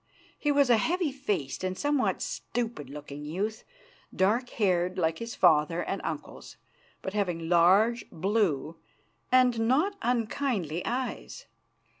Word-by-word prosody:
He 295 Hz, -, +1 dB
was 280 Hz, -3 st, +4 dB
a 235 Hz, -, +6 dB
heavy 340 Hz, -, 0 dB
faced 205 Hz, -, -3 dB
and 185 Hz, 0 st, -2 dB
somewhat 290 Hz, -2 st, 0 dB
stupid 230 Hz, -, -4 dB
looking 145 Hz, 0 st, -8 dB
youth, 195 Hz, +9 st, -3 dB, 0.5 s
dark 220 Hz, +7 st, +1 dB
haired, 185 Hz, -3 st, 0 dB
like 165 Hz, -2 st, 0 dB
his 230 Hz, +1 st, -6 dB
father 165 Hz, 0 st, +3 dB
and -, -, -3 dB
uncles, -, -, -6 dB, 0.5 s
but 190 Hz, -, -4 dB
having 175 Hz, -6 st, -1 dB
large, 190 Hz, +8 st, +4 dB
blue, 170 Hz, -5 st, 0 dB, 0.5 s
and 250 Hz, -2 st, +4 dB
not 315 Hz, -, +2 dB
unkindly 225 Hz, -, -1 dB
eyes. 250 Hz, +1 st, -4 dB
205 Hz, 125 wpm, -28 LUFS, 170-245 Hz, 0.5 s, a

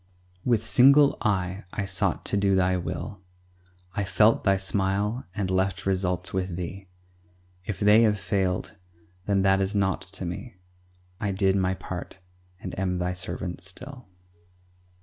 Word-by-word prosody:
With 115 Hz, -3 st, +1 dB
single 140 Hz, +5 st, +6 dB
eye 95 Hz, -3 st, -1 dB
I 100 Hz, -, -3 dB
sought 95 Hz, -1 st, -1 dB
to -, -, +1 dB
do 100 Hz, -1 st, +3 dB
Thy 95 Hz, 0 st, +3 dB
will. 90 Hz, +2 st, -5 dB, 0.7 s
I 100 Hz, -, -1 dB
felt 105 Hz, +3 st, +3 dB
Thy 95 Hz, -1 st, +3 dB
smile 100 Hz, +4 st, -1 dB
and 100 Hz, -3 st, -1 dB
left 95 Hz, +1 st, 0 dB
results 90 Hz, -1 st, 0 dB
with 95 Hz, -2 st, -2 dB
Thee; 95 Hz, +2 st, -6 dB, 0.8 s
If 105 Hz, -, -4 dB
they 105 Hz, +2 st, +6 dB
have 105 Hz, -3 st, +3 dB
failed, 95 Hz, +1 st, -1 dB, 0.5 s
then 100 Hz, -1 st, +2 dB
that 95 Hz, 0 st, +4 dB
is 95 Hz, +2 st, -1 dB
naught 95 Hz, -1 st, +1 dB
to 95 Hz, -, -4 dB
me 90 Hz, +7 st, -6 dB, 0.6 s
I 105 Hz, -, -1 dB
did 95 Hz, 0 st, +2 dB
my 95 Hz, -1 st, +1 dB
part, 90 Hz, 0 st, -7 dB, 0.4 s
and -, -, -7 dB
am 90 Hz, -1 st, 0 dB
Thy 90 Hz, 0 st, -1 dB
servant 90 Hz, -1 st, -5 dB
still. 125 Hz, +7 st, -10 dB
95 Hz, 150 wpm, -26 LUFS, 95-105 Hz, 0.8 s, single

